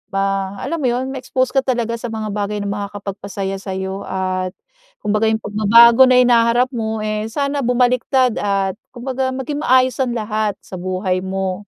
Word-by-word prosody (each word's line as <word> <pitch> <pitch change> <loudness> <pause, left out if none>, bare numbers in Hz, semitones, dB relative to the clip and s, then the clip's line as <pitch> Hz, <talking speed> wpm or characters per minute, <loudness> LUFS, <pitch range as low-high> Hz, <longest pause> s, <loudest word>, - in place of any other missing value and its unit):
ma 195 0 -1
alam 335 - -2
mo 265 - 0
yun, 250 +2 -1
ma-expose 255 -1 -1
ka 270 - +3
talaga 235 -3 -1
sa 240 - -5
mga 215 -1 -4
bagay 205 0 -2
na 200 - -3
makakapagpasaya 200 -1 -5
sa'yo 190 0 -4
at, 185 -1 -2 0.5
kumbaga 215 +1 +1
'yung 220 0 0
pagbabago 230 +4 +6
na 255 - +5
hinaharap 240 +1 +3
mo, 220 -2 -2
eh, 215 0 -2
sana 280 +4 -2
bumaliktad 250 0 +2
at 195 -1 -1 0.2
kumbaga 260 +1 -2
maging 285 +3 -4
maayos 255 -2 +3
ang 250 -2 0
lahat 215 -2 -1
sa 185 - -8
buhay 185 0 -1
mo. 190 +1 -3
215 Hz, 165 wpm, -19 LUFS, 195-250 Hz, 0.5 s, pagbabago